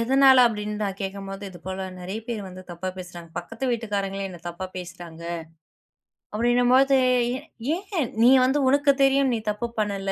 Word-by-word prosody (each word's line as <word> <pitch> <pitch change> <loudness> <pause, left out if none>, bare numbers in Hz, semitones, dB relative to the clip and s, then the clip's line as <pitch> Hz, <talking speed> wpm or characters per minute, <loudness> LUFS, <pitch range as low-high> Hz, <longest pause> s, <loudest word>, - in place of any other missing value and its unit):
எதனால 265 +2 +6
அப்படின்னு 210 -2 -2
நான் 195 -1 -3
கேட்கும்போது, 195 0 -5
"இது 175 - -12
போல 190 0 -4
நெறைய 190 +5 -5
பேர் 225 -3 -2
வந்து 185 0 -10
தப்பா 175 +2 -5
பேசுறாங்க." 175 -2 -9
பக்கத்து 225 +9 -6
வீட்டுக்காரங்களே 200 -4 -2
என்ன 180 - -10
தப்பா 175 +2 -5
பேசுறாங்க. 175 -2 -8 1.1
அப்படின்னும் 240 +2 +3
போது. 270 +1 +5 0.8
"ஏன்? 380 - -2 0.2
நீ 240 - +8 0.2
வந்து 270 +3 +2
உனக்கு 285 +1 +4
தெரியும். 270 -1 +4
நீ 225 - 0
தப்பு 225 +3 -3
பண்ணல. 200 -2 -1
210 Hz, 155 wpm, -25 LUFS, 185-245 Hz, 1.1 s, நீ